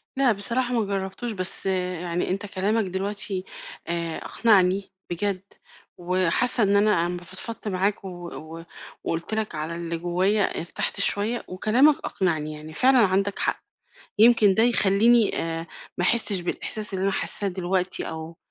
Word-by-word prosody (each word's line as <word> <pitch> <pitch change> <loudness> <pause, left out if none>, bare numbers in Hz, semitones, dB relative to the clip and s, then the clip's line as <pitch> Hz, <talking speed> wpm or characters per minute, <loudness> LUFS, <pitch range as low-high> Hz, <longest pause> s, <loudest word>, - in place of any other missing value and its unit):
لا 265 -2 +3
بصراحة 235 +5 -1
مجرّبتوش، 200 +1 -3
بس 185 -3 +1
يعني 180 -2 -2
أنت 195 +2 -3
كلامك 205 +3 -1
دلوقتي 195 0 -2 0.4
آآ، 170 -1 -2
أقنعني 195 -3 +2 0.2
بجد 185 +2 -2 0.6
وحاسّة 185 +7 +3
إن 200 0 +2
أنا 200 -4 +3
أمّا 175 0 -5
فضفضت 215 +6 -6
معاك 200 +1 -1
و 190 - -5 0.3
و 165 +1 -9 0.4
وقُلت 165 +6 -3
لك 220 -4 -2
على 155 +2 -4
اللي 170 0 -4
جوّايا 185 +5 +1 0.2
ارتحت 175 +4 -4
شوية 210 +4 +2
وكلامك 240 +11 +3
أقنعني، 155 -5 -2
يعني 155 +1 -10
فعلًا 260 +8 +4
عندك 200 -2 +2
حق، - - -1 0.6
يمكن 220 -3 +6
ده 220 - +3
يخلّيني 230 0 +3
آآ، 165 0 -4 0.3
ما 180 - -1
أحسّش 210 -1 +4
بالإحساس 210 +4 -2
اللي 190 0 -2
أنا 195 - +1
حاسّاه 200 +1 +1
دلوقتي 185 0 -1
أو 160 +1 -8
195 Hz, 145 wpm, -24 LUFS, 175-215 Hz, 0.6 s, يمكن